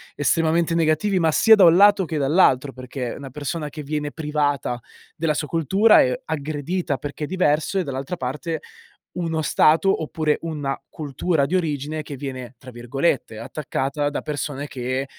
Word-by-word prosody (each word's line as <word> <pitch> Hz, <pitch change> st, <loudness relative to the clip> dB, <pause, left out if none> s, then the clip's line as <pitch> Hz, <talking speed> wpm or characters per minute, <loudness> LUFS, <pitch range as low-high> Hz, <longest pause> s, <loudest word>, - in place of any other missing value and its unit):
estremamente 165 Hz, +3 st, +1 dB
negativi, 165 Hz, +4 st, +2 dB
ma 165 Hz, -2 st, +3 dB
sia 220 Hz, +8 st, +6 dB
da 200 Hz, -4 st, +6 dB
un 165 Hz, 0 st, +7 dB
lato 200 Hz, 0 st, +6 dB
che 160 Hz, -1 st, -3 dB
dall'altro, 140 Hz, -2 st, +3 dB
perché 130 Hz, -1 st, -6 dB
una 140 Hz, -2 st, -8 dB
persona 150 Hz, +3 st, -4 dB
che 150 Hz, +1 st, -8 dB
viene 150 Hz, 0 st, -3 dB
privata 145 Hz, -5 st, -1 dB, 0.4 s
della 160 Hz, -1 st, +1 dB
sua 150 Hz, 0 st, -3 dB
cultura 190 Hz, -, +4 dB
è 125 Hz, 0 st, +1 dB
aggredita 155 Hz, +1 st, -2 dB
perché 145 Hz, +2 st, -5 dB
è -, -, -8 dB
diverso 180 Hz, +1 st, +1 dB
e -, -, 0 dB
dall'altra 135 Hz, +2 st, -4 dB
parte, 150 Hz, +3 st, -4 dB, 0.5 s
uno 165 Hz, -2 st, -2 dB
stato 160 Hz, +5 st, +3 dB
oppure 155 Hz, -1 st, 0 dB
una 150 Hz, -4 st, -3 dB
cultura 150 Hz, +1 st, -1 dB
di 165 Hz, +7 st, -1 dB
origine 155 Hz, -3 st, -2 dB
che 145 Hz, -1 st, -8 dB
viene 130 Hz, -2 st, -7 dB
tra 130 Hz, +1 st, -12 dB
virgolette, 120 Hz, -1 st, -1 dB
"attaccata" 140 Hz, +3 st, -2 dB
da 145 Hz, -, -4 dB
persone 145 Hz, -1 st, -4 dB
che, 130 Hz, 0 st, -3 dB
150 Hz, 160 wpm, -22 LUFS, 135-165 Hz, 0.5 s, un